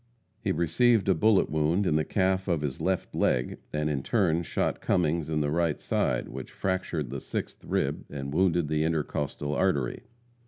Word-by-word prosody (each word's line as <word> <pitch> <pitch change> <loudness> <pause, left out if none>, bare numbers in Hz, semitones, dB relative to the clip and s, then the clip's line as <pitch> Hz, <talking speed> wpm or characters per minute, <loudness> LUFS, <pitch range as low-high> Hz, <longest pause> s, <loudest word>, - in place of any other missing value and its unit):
He - - +1
received 100 +8 +3
a 95 - +5
bullet 100 +4 +3
wound 80 +6 +1
in 75 - +2
the 80 - +2
calf 95 +1 0
of 85 -5 +1
his 70 -3 -3
left 95 -1 -1
leg, - - 0
and 75 0 -1
in 75 -3 -1
turn 85 - +2
shot 85 - -1
Cummings 85 -3 +1
in 75 -1 0
the 75 -1 0
right 85 -1 +1
side, - - 0
which - - -7
fractured 90 -8 -2
the 70 -1 -4
sixth - - -5
rib - - -1
and 70 -1 -5
wounded 85 -2 +2
the 75 0 +1
intercostal 75 -2 -2
artery. 75 -9 0
80 Hz, 180 wpm, -28 LUFS, 75-95 Hz, -, a